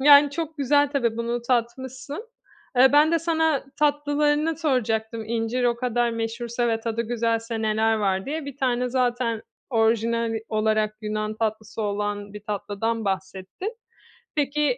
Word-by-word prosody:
yani, 285 Hz, +1 st, +8 dB
çok 315 Hz, +1 st, -4 dB
güzel 285 Hz, +1 st, +3 dB
tabii, 240 Hz, -6 st, 0 dB
bunu 235 Hz, +1 st, -2 dB
tatmışsın. 260 Hz, -, -2 dB, 0.5 s
Eee, 260 Hz, +2 st, +7 dB
ben 300 Hz, +3 st, +6 dB
de 335 Hz, -, +4 dB
sana 320 Hz, -3 st, +1 dB
tatlılarını 295 Hz, +1 st, +2 dB
soracaktım, 230 Hz, -7 st, 0 dB
"İncir 230 Hz, +2 st, -1 dB
o 240 Hz, -1 st, +2 dB
kadar 240 Hz, -1 st, +1 dB
meşhursa 235 Hz, +1 st, -2 dB
ve 225 Hz, -1 st, 0 dB
tadı 230 Hz, 0 st, -1 dB
güzelse 230 Hz, -1 st, -1 dB
neler 220 Hz, +1 st, +2 dB
var?" 195 Hz, -3 st, 0 dB
diye. 305 Hz, +2 st, -3 dB
Bir 280 Hz, -2 st, -7 dB
tane 250 Hz, -2 st, +1 dB
zaten 245 Hz, -2 st, 0 dB, 0.3 s
orijinal 230 Hz, 0 st, +2 dB, 0.2 s
olarak 215 Hz, 0 st, +1 dB
Yunan 215 Hz, 0 st, -2 dB
tatlısı 220 Hz, 0 st, -3 dB
olan 205 Hz, 0 st, -2 dB
bir 210 Hz, -, -8 dB
tatlıdan 210 Hz, +2 st, -2 dB
bahsettin. 190 Hz, -, -4 dB, 0.6 s
Peki, 295 Hz, -, +1 dB
235 Hz, 140 wpm, -25 LUFS, 220-280 Hz, 0.6 s, yani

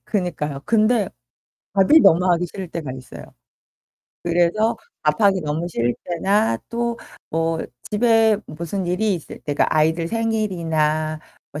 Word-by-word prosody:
그니까요. 160 Hz, -8 st, -2 dB
근데 215 Hz, -2 st, +2 dB, 0.7 s
밥이 200 Hz, +11 st, +6 dB
너무 175 Hz, +3 st, +5 dB
하기 175 Hz, +1 st, 0 dB
싫을 185 Hz, +1 st, -7 dB
때가 160 Hz, -6 st, -5 dB
있어요. 130 Hz, -1 st, -10 dB, 1.0 s
그래서 175 Hz, +6 st, +2 dB, 0.3 s
밥하기 200 Hz, -4 st, +3 dB
너무 155 Hz, +3 st, -2 dB
싫을 120 Hz, -6 st, 0 dB
때나 180 Hz, -, +1 dB
또 235 Hz, 0 st, -2 dB, 0.3 s
뭐 165 Hz, 0 st, 0 dB, 0.3 s
집에 225 Hz, 0 st, +4 dB
무슨 170 Hz, +5 st, -4 dB
일이 195 Hz, +4 st, +1 dB
있을 170 Hz, -, -8 dB
때가 145 Hz, -1 st, 0 dB
아이들 160 Hz, +2 st, +2 dB
생일이나 165 Hz, -9 st, 0 dB, 0.3 s
뭐 150 Hz, -, -5 dB
175 Hz, 265 characters per minute, -21 LUFS, 155-215 Hz, 1.0 s, 밥이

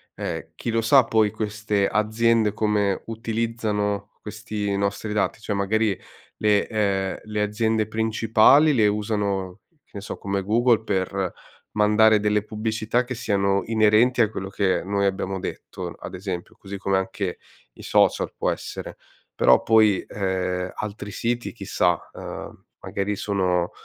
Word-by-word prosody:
ehm, -, -, -5 dB
chi 115 Hz, -, -3 dB
lo 115 Hz, 0 st, +1 dB
sa 130 Hz, +4 st, +6 dB
poi 110 Hz, -3 st, +2 dB
queste 105 Hz, -1 st, -1 dB
aziende 110 Hz, +1 st, +2 dB
come 105 Hz, -2 st, 0 dB
utilizzano 110 Hz, -3 st, -2 dB
questi 105 Hz, -1 st, -4 dB
nostri 100 Hz, +2 st, -2 dB
dati, 105 Hz, +1 st, -1 dB
cioè 105 Hz, -, -3 dB
magari 100 Hz, +1 st, +1 dB, 0.4 s
le 105 Hz, -1 st, +2 dB
uhm, 100 Hz, -2 st, -1 dB
le 105 Hz, 0 st, -1 dB
aziende 110 Hz, +1 st, 0 dB
principali 110 Hz, +7 st, +4 dB
le 110 Hz, -4 st, +4 dB
usano, 105 Hz, -2 st, -1 dB
che 160 Hz, -3 st, -39 dB
ne 100 Hz, -, -6 dB
so, -, -, -6 dB
come 100 Hz, -1 st, -2 dB
Google, 115 Hz, +2 st, +3 dB
per 95 Hz, -2 st, -1 dB, 0.4 s
mandare 105 Hz, 0 st, +4 dB
delle 105 Hz, 0 st, +2 dB
pubblicità 110 Hz, +2 st, -1 dB
che 125 Hz, +1 st, -5 dB
siano 100 Hz, -4 st, +1 dB
inerenti 115 Hz, +3 st, +4 dB
a 110 Hz, -, +3 dB
quello 95 Hz, -3 st, -5 dB
che 95 Hz, -3 st, +1 dB
noi 100 Hz, +1 st, -1 dB
abbiamo 95 Hz, 0 st, -1 dB
detto, -, -, -6 dB
ad -, -, -9 dB
esempio, 90 Hz, -2 st, -6 dB
così 100 Hz, 0 st, -8 dB
come 100 Hz, 0 st, 0 dB
anche 95 Hz, -1 st, -3 dB, 0.4 s
i -, -, -13 dB
social -, -, +2 dB
può -, -, 0 dB
essere, -, -, -5 dB, 0.4 s
però -, -, +5 dB
poi, 110 Hz, -3 st, +4 dB
ehm, 90 Hz, -2 st, -2 dB
altri 105 Hz, -1 st, -6 dB
siti, 120 Hz, +2 st, -2 dB
chissà, 90 Hz, -5 st, 0 dB
uhm, -, -, -8 dB, 0.2 s
magari 100 Hz, +1 st, -3 dB
sono 90 Hz, -4 st, 0 dB
105 Hz, 145 wpm, -24 LUFS, 100-110 Hz, 0.4 s, sa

